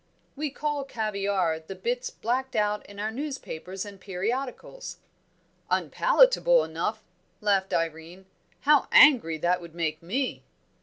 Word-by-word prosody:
"We 300 +1 -2
call 295 +1 -2
caviare 200 -8 -1
the 160 +4 -9
bits 245 +6 -2
blacked 260 +3 -2
out 210 0 +1
in 200 0 -11
our 215 +1 -2
newspapers 220 - -5
and 200 -2 -11
periodicals." 245 - -4 0.7
"Unpalatable - - +4
enough!" - - -3 0.4
laughed 195 -2 +1
Irene. 165 +3 -3 0.4
"How 295 0 +4
angry 235 - +7
that 175 +3 +1
would 170 -1 -12
make 160 -2 -2
me!" 250 +10 -2
210 Hz, 120 wpm, -27 LUFS, 180-270 Hz, 0.7 s, angry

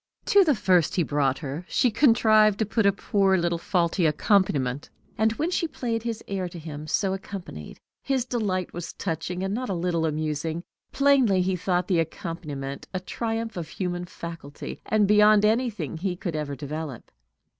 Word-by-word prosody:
To 400 -1 +6
the 305 -6 +3
first 185 -6 +2
he 175 - +2
brought 140 -3 +1
her 150 +2 -5
she 250 - +2
contrived 215 -4 +5
to 220 - +1
put 215 0 +1
a - - +6
poor 195 -1 +2
little 170 -1 0
faulty 170 -1 +1
accompaniment; 150 -6 +1 0.3
and 220 +1 +2
when 315 +9 -2
she 340 - 0
played 235 -6 -3
his 230 -1 -4
air 190 -2 -2
to 175 - -10
him 155 -2 -7
so 190 +4 +1
accompanied, 190 - -8 0.2
his 265 -3 0
delight 200 -8 -2
was 170 -1 -6
touching, 175 +1 -3
and 195 +1 -1
not 250 +2 -3
a 190 - -1
little 170 -2 0
amusing. 155 +2 -2 0.3
Plainly 265 -10 +4
he 185 0 0
thought 180 0 0
the 180 -4 +2
accompaniment 150 -4 -5
a - - 0
triumph 225 +4 -3
of 170 -3 -4
human 180 -1 -3
faculty, 165 -4 -8
and 215 -2 +3
beyond 210 0 +6
anything 225 -5 0
he 180 +2 -2
could 175 -2 -4
ever 150 -2 -3
develop. 145 -2 -6
185 Hz, 175 wpm, -26 LUFS, 160-215 Hz, 0.3 s, To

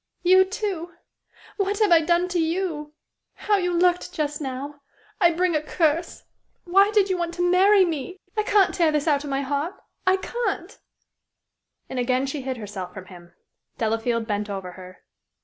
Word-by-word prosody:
"You, 375 +1 +6
too! 380 -4 -4 0.6
What 400 0 0
have 425 -3 +2
I 335 -1 +7
done 345 +2 +2
to 355 -1 -1
you? 320 -3 -2 0.4
How 415 -1 +1
you 360 -2 0
looked, 355 +1 +2
just 300 -3 -3
now! 280 +2 -6 0.4
I 345 -4 +6
bring 345 0 0
a 305 - +1
curse. 320 +1 -1 0.4
Why 390 +3 +4
did 415 -2 +3
you 365 - -1
want 340 0 -3
to 355 0 +1
marry 380 +2 +5
me? 330 +2 -4 0.2
I 425 - +2
can't 415 -2 +3
tear 330 -3 +2
this 300 +1 -1
out 290 -2 +2
of 290 - -6
my 275 0 -1
heart 285 +5 -2 0.3
I 375 0 +5
can't!" 400 -3 -4 1.1
And 260 - -4
again 255 +2 +1
she 275 +1 -4
hid 260 -1 -4
herself 195 -4 -7
from 190 -1 -8
him. 175 -1 -15 0.4
Delafield 225 +1 -1
bent 210 -1 -2
over 190 -2 -5
her. 185 0 -13
330 Hz, 175 wpm, -24 LUFS, 265-365 Hz, 1.1 s, I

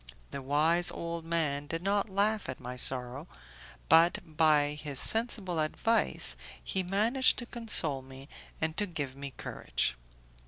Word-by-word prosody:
The 140 - -5
wise 155 +6 +2
old 170 -1 -5
man 150 -4 -1
did 165 +3 -4
not 200 +2 +1
laugh 205 -2 0
at 130 - -5
my 125 0 -7
sorrow, 125 +4 -1 0.6
but 165 +3 +6
by 155 -2 +3
his 145 -2 -4
sensible 215 -7 +1
advice 225 +9 +1 0.3
he 190 - -1
managed 215 +8 +2
to 240 - -3
console 210 - +2
me 135 +1 -11 0.3
and 160 0 -2
to 205 - 0
give 145 -7 -5
me 140 0 -7
courage. - - -2
160 Hz, 145 wpm, -30 LUFS, 140-195 Hz, 0.6 s, but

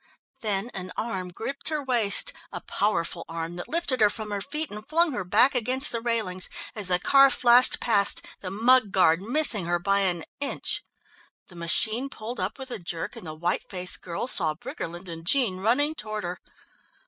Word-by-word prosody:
Then 210 +1 -2
an 185 -1 -6
arm 190 -5 -3
gripped 225 - -4
her 305 -2 -2
waist, 245 - +4 0.2
a - - -5
powerful 170 -4 -1
arm 165 0 -5
that 175 - -7
lifted 285 -7 -1
her 210 - +6
from 215 0 -6
her 200 -1 -3
feet 300 +8 -4
and 210 +1 -7
flung 335 +1 +3
her 245 - -3
back 220 +9 +4
against 255 +3 +2
the 230 - -1
railings, 220 -6 0 0.2
as 210 -5 -2
the 180 -1 +3
car 275 +8 +5
flashed 245 -1 +5
past, 205 -4 +2
the 185 - -6
mud 225 +2 +3
guard 180 -2 +3
missing 230 - +1
her 175 0 +1
by 195 +3 +1
an 180 -4 -1 0.2
inch. 285 - -3 0.7
The 180 - -15
machine 220 +10 +2
pulled 235 -1 -7
up 185 +2 -3
with 265 -1 -9
a - - -4
jerk, 170 -1 -5
and 180 - -10
the 155 - -7
white 170 +3 -2
faced 180 -1 +2
girl 170 +3 -4
saw 165 -11 +3
Briggerland 175 +3 -7
and 165 -1 -8
Jean 220 0 +1
running 250 +10 +1
toward 215 -7 -6
her. 175 +1 -5
210 Hz, 190 wpm, -25 LUFS, 180-250 Hz, 0.7 s, her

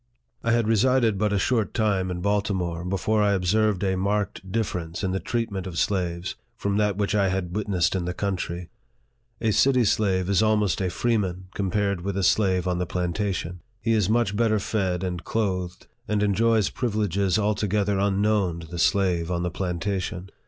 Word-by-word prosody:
I 115 - +1
had 115 -2 +2
resided 115 -1 +3
but 105 0 +1
a 100 - +1
short 110 +2 0
time 100 -4 +1
in 90 -1 -4
Baltimore 95 -4 -1
before 100 +4 0
I 100 -1 +3
observed 100 +1 +1
a 95 -1 +1
marked 100 0 -2
difference, 90 -5 -2
in 95 - 0
the 95 - -1
treatment 105 -6 -3
of 85 -3 -6
slaves, 90 -2 -1 0.2
from 100 0 -1
that 105 -2 +1
which 105 0 0
I 100 -2 +3
had 90 -2 -2
witnessed 100 -5 +1
in 95 -2 -1
the 90 - -2
country. 90 -3 -3 0.7
A 110 - +2
city 130 +3 +4
slave 95 -4 +1
is 100 0 +3
almost 105 -3 +2
a 95 - 0
freeman, 95 -4 -1
compared 100 -1 -1
with 100 +1 -3
a 100 - 0
slave 95 -2 +2
on 90 -1 0
the 90 - -1
plantation. 90 0 -2 0.2
He 115 - -1
is 105 -3 +2
much 110 -3 +2
better 110 0 +2
fed 95 -3 -1
and 90 -2 -3
clothed, 90 -5 -2 0.2
and 105 -1 +1
enjoys 110 +1 +2
privileges 100 -5 0
altogether 105 -1 0
unknown 100 -3 +1
to 80 - -10
the 85 +1 -6
slave 90 -3 +2
on 85 -1 -1
the 90 - -1
plantation. 90 +1 -3
100 Hz, 180 wpm, -25 LUFS, 90-105 Hz, 0.7 s, city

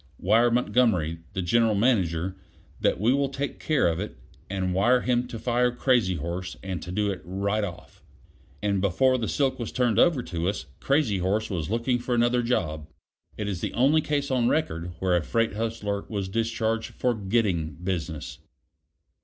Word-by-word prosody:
Wire 115 +6 +4
Montgomery 115 -9 +2
(the 95 -2 -2
General 115 +4 +3
Manager) 95 -6 +1 0.4
that - - +1
we 115 +5 +3
will 140 0 +1
take 140 +1 -4
care 155 - +2
of 85 0 0
it. 105 - -5 0.3
And 95 -1 -1
wire 120 +7 +3
him 125 0 +1
to 115 - -6
fire 125 +1 +1
Crazy 120 -6 +2
horse 85 +3 -4
and 95 -2 -4
to 90 - -7
do 100 +2 0
it 90 - -6
right 100 +5 -1
off." 90 -5 -8 0.6
And 100 -2 +1
before 130 +7 +3
the 110 - -2
silk 135 -3 0
was 120 - -4
turned 125 -3 +1
over 160 -8 +4
to 85 -2 -2
us 100 - -4
Crazy 135 -9 +1
horse 105 +5 0
was 85 -4 -2
looking 120 +3 0
for 120 0 -1
another 120 +1 +3
job. 80 -11 -1 0.5
It 105 - -3
is 95 -4 -3
the - - -3
only 140 +6 +4
case 145 -2 -1
on 125 -2 +2
record 90 - -1
where 90 0 +1
a 85 - +2
freight 115 +8 0
hustler 105 -2 -2
was 100 -3 -3
discharged 115 +1 -1
for 125 - +1
getting 95 -6 0
business. 85 -3 -4
110 Hz, 180 wpm, -26 LUFS, 95-120 Hz, 0.6 s, Wire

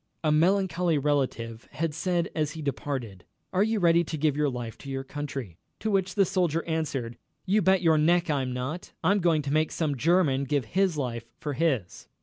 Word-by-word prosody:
A 155 - +3
melancholy 180 0 +2
relative 130 -5 -1
had 155 +2 -1
said, 170 +1 -1
as 155 -2 -1
he 160 -2 -7
departed: 130 -8 -4 0.3
"Are 185 - +2
you 220 +1 +2
ready 170 -1 +4
to 155 - -4
give 150 -1 +1
your 150 -1 +1
life 120 -3 -5
to 140 - -9
your 135 0 -3
country?" 135 - -6 0.2
To 220 - -1
which 190 -2 0
the 200 -2 +4
soldier 170 -3 0
answered: 140 -8 -2 0.3
"You 205 +3 +3
bet 190 0 +3
your 160 -2 +4
neck 175 +3 +3
I'm 135 -5 0
not 130 +8 -5
I'm 200 +2 +3
going 165 -4 +2
to 140 0 -2
make 155 0 +2
some 155 -4 -1
German 145 -1 +2
give 140 -2 0
his 185 - +1
life 120 -4 -3
for 150 -1 -3
his." 135 - -1
155 Hz, 195 wpm, -27 LUFS, 135-175 Hz, 0.3 s, ready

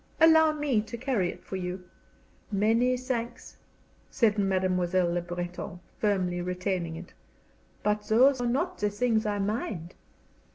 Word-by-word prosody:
"Allow 320 -1 +6
me 290 -7 +1
to 230 +2 -7
carry 235 -8 0
it - - -9
for 190 - -5
you." 180 0 -4 0.7
"Many 225 +5 +2
thanks," 245 -2 -4 0.5
said 220 -3 +2
Mademoiselle 185 -2 +1
Le 175 - 0
Breton, 175 0 -6 0.2
firmly 185 -4 0
retaining 180 -2 -2
it, 170 +2 -10 0.7
"but 210 0 0
those 255 +4 +5
are 245 - 0
not 340 +10 -1
the 210 - +1
things 220 +1 +1
I 205 -1 0
mind." 195 -4 -3
210 Hz, 135 wpm, -28 LUFS, 180-245 Hz, 0.7 s, Allow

